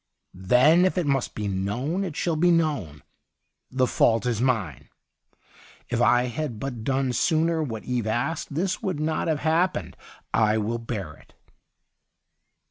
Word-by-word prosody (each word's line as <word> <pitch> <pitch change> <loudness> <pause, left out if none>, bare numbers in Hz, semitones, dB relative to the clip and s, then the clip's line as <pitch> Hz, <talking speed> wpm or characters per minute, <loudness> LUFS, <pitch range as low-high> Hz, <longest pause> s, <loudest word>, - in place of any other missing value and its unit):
'Then 125 - +4
if 185 0 +1
it 180 - +1
must 135 -2 -1
be 105 -1 -3
known, 105 - -2
it 175 -6 -5
shall 170 0 -1
be 175 +3 +3
known. 145 - 0 0.7
The 130 0 +1
fault 115 -1 +2
is 120 -2 -1
mine. 110 - -1 1.0
If 120 0 0
I 125 0 +4
had 125 -1 -4
but 125 -4 -5
done 135 0 0
sooner 160 +5 +1
what 115 -8 -4
Eve 125 -3 -2
asked, 140 +6 -2
this 180 +3 -1
would 185 -6 -2
not 155 +1 -1
have 155 -2 0
hap 165 +4 +2
pened. - - -5 0.4
I 110 -1 +3
will 110 +2 -2
bear 105 -9 -5
it.' - - -21
125 Hz, 155 wpm, -25 LUFS, 110-160 Hz, 1.0 s, Then